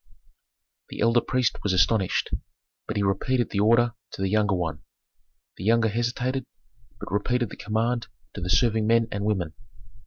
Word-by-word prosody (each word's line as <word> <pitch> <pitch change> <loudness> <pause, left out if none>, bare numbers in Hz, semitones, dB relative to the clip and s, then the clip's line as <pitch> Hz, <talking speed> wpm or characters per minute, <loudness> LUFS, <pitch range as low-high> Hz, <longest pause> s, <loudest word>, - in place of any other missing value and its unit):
The - - -8
elder 115 +2 +4
priest 130 -1 0
was 100 - 0
astonished, 95 +2 +2 0.6
but - - -3
he 100 - +1
repeated 120 +6 0
the 100 - -1
order 115 +3 +4 0.2
to - - -6
the 95 - 0
younger 105 -2 +2
one. 80 -4 -3 0.8
The - - -7
younger 115 +2 +3
hesitated, 120 +3 -1 0.5
but - - -8
repeated 120 +2 0
the - - -7
command 115 +2 -1 0.3
to 100 - -7
the 90 - -3
serving 110 +3 +3
men 115 0 +3
and 100 0 -3
women. 95 -7 -1
110 Hz, 160 wpm, -25 LUFS, 100-120 Hz, 0.8 s, elder